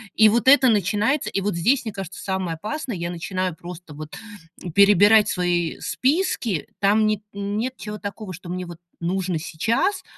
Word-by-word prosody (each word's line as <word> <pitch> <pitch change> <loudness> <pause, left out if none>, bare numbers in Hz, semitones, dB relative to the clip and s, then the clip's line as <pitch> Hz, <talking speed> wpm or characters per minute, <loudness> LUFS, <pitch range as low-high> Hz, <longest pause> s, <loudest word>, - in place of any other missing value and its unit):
И 215 0 +7
вот 235 +3 +1
это 265 -1 +7
начинается, 210 - +1
и 195 - -2
вот 205 -1 -1
здесь, 245 +11 +2
мне 220 - -4
кажется, 195 -2 -7
самое 190 -3 -2
опасное, 240 - -5
я 170 0 -4
начинаю 185 +1 -3
просто 175 -1 -10
вот 155 +1 -9 0.6
перебирать 205 +2 +6
свои 175 -2 0
списки. 235 - 0
Там 210 +2 +3
нет 215 -1 +1
нет 205 +6 -3
чего-то 210 0 -7
такого, 200 0 -6
что 175 +1 -10
мне 180 +1 -4
вот 175 -1 -9 0.2
нужно 180 -1 -1
сейчас, 220 - -1
200 Hz, 165 wpm, -23 LUFS, 175-220 Hz, 0.6 s, И